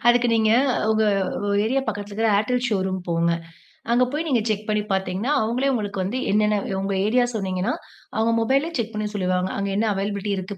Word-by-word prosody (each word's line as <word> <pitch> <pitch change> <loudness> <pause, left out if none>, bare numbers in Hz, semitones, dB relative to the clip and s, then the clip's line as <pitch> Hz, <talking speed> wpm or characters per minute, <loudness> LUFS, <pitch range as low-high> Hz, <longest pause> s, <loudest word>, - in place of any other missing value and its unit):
அதுக்கு 240 0 +4
நீங்க 220 -1 +3 0.4
உங்க 220 0 +2 0.6
ஏரியா 265 +5 +1
பக்கத்துல 205 0 -4
இருக்கற 225 +2 +1
Airtel 250 +5 +1
ஷோரூம் 190 -3 -1
போங்க. 170 0 +2 0.6
அங்க 250 +1 +4
போய் 310 +2 -1
நீங்க 250 -5 +2
செக் 215 0 -2
பண்ணி 210 0 +1
பார்த்தீங்கன்னா, 190 +7 -1
அவங்கலே 245 +5 0
உங்களுக்கு 205 -4 -2
வந்து 205 +8 -2
எனனன்ன 210 0 +3 0.2
உங்க 195 0 -1
ஏரியா 245 +3 +3
சொன்னீங்கினா 195 0 -1 0.4
அவங்க 225 +1 +2
மொபைல்யே 275 +7 +1
செக் 230 -1 -2
பண்ணி 215 0 -2
சொல்லுவாங்க. 185 -1 0
அங்க 200 0 -1
என்ன 220 +2 +1
அவைலபிலிட்டி 200 +1 -2
இருக்கு 190 +2 -5
210 Hz, 175 wpm, -23 LUFS, 195-235 Hz, 0.6 s, அதுக்கு